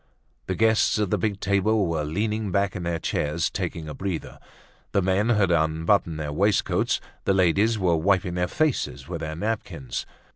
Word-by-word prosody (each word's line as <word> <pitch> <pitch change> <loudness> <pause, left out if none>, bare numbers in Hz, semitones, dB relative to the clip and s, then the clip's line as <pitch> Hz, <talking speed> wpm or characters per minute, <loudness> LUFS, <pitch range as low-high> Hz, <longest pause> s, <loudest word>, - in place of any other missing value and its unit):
The 95 - -1
guests 110 +2 +3
at 105 -3 0
the - - +3
big 105 -3 -1
table 100 +1 +2
were 80 -3 -1
leaning 105 +6 -2
back 100 +1 +1
in 90 - -4
their 85 -1 -1
chairs 75 0 -1
taking 80 -1 -4
a 75 - -5
breather. 95 -2 -5 0.5
The 100 - +3
men 95 +4 +2
had 105 -6 +3
unbuttoned 80 +1 +1
their 75 -1 -3
waistcoats, 100 +5 +1 0.3
the 95 - +3
ladies 95 +5 +3
were 90 -4 +2
wiping 90 +2 +1
their 90 0 0
faces 120 - -1
with 85 -2 -5
their 80 0 -4
napkins. 85 - -4
95 Hz, 175 wpm, -25 LUFS, 80-105 Hz, 0.5 s, guests